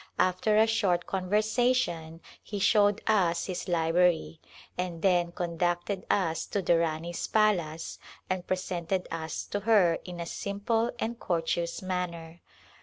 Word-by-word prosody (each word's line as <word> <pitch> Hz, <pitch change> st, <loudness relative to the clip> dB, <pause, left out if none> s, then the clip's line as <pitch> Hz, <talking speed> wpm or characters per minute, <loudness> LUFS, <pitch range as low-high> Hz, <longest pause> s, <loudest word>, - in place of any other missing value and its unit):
After 185 Hz, +4 st, +2 dB
a 220 Hz, -, +6 dB
short 195 Hz, -6 st, +1 dB
conversation 195 Hz, -4 st, 0 dB, 0.2 s
he 205 Hz, -, -6 dB
showed 205 Hz, +1 st, +3 dB
us 175 Hz, -6 st, +2 dB
his 185 Hz, 0 st, -4 dB
library, 170 Hz, -1 st, +2 dB, 0.3 s
and 180 Hz, -2 st, -4 dB
then 175 Hz, -3 st, +3 dB
conducted 175 Hz, +2 st, -2 dB
us 165 Hz, -5 st, 0 dB
to 200 Hz, -, -2 dB
the 170 Hz, -1 st, +3 dB
Rani's 165 Hz, +1 st, -2 dB
palace 175 Hz, -7 st, +1 dB, 0.3 s
and 185 Hz, -1 st, -3 dB
presented 185 Hz, 0 st, -2 dB
us 160 Hz, -1 st, -4 dB
to 205 Hz, -, -3 dB
her 200 Hz, -6 st, +4 dB
in 175 Hz, -1 st, -8 dB
a 170 Hz, -, -3 dB
simple 205 Hz, +6 st, -1 dB
and 230 Hz, +1 st, -3 dB
courteous 170 Hz, +1 st, -1 dB
manner. 170 Hz, -2 st, -4 dB
180 Hz, 130 wpm, -29 LUFS, 170-205 Hz, 0.3 s, a